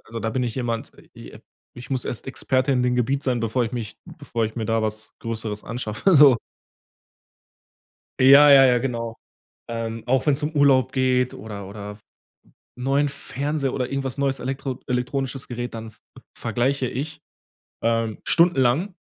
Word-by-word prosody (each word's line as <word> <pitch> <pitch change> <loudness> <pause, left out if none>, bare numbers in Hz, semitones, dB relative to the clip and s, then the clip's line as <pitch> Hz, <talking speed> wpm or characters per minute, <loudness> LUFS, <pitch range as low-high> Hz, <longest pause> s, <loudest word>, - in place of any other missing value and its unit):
also 115 0 -7
da 115 - -2
bin 125 +3 -1
ich 120 -3 -2
jemand, 115 -3 -3 0.2
i - - -11
äh, - - -13 0.3
ich 120 +1 -10
muss 130 -3 -2
erst 120 - -5
Experte 130 0 0
in 125 -2 +2
dem 125 0 +1
Gebiet 135 +3 0
sein, 125 -3 0
bevor 115 +2 0
ich 115 - -5
mich 115 -4 -5
bevor 115 -1 -4
ich 110 - -4
mir 110 -2 -3
da 115 0 +1
was 110 0 -4
Größeres 110 -2 -5
anschaffe, 120 - 0
so. 140 -4 +8 1.9
Ja, 140 +3 +8
ja, 135 -1 +9
ja, 125 -1 +4
genau. 115 -3 -3 0.5
Ähm, 115 -1 -4
auch 130 +1 +2
wenn's 150 -1 +2
um 150 - -1
Urlaub 135 -3 +4
geht 130 -1 +1
oder 100 -1 -8
oder 105 0 -8 0.8
'n 125 - -7
neuen 140 +2 +2
Fernseher 140 0 -3
oder 125 -2 -1
irgendwas 135 -1 -3
neues 135 -1 0
elektro 130 0 -4
elektronisches 125 +1 -2
Gerät, 120 -1 -5
dann 110 0 -7
v - - -22 0.4
vergleiche 130 +1 -1
ich, 155 +5 -5 0.6
ähm, 115 -1 0
stundenlang 170 +2 +2
125 Hz, 165 wpm, -23 LUFS, 115-135 Hz, 1.9 s, ja